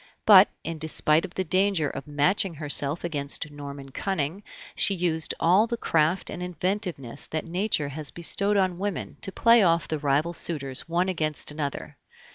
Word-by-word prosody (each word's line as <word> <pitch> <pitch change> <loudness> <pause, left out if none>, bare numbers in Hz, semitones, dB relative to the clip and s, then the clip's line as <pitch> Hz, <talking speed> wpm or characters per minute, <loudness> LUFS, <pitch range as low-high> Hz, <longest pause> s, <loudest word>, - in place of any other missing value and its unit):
But, 200 -2 +8
in 165 -1 -5
despite 155 0 +1
of 175 - -12
the 190 - -1
danger 185 -2 +1
of 135 +1 -7
matching 165 +5 +1
herself 145 +1 0
against 150 -2 -2
Norman 140 -1 -9
cunning, 170 +3 -3 0.3
she 200 - +1
used 165 -3 0
all 190 +7 +4
the 235 0 -3
craft 165 -1 +1
and 180 - -6
inventiveness 180 - -3
that 155 -1 -4
Nature 175 -4 0
has 145 0 -6
bestowed 200 +5 0
on 185 -2 0
women 200 -1 -4
to 195 - 0
play 230 +3 +5
off 170 -4 +2
the 155 - -3
rival 145 +4 0
suitors 145 -4 0
one 175 +2 +1
against 155 -5 -1
another. 150 -2 -5
165 Hz, 165 wpm, -25 LUFS, 150-185 Hz, 0.3 s, But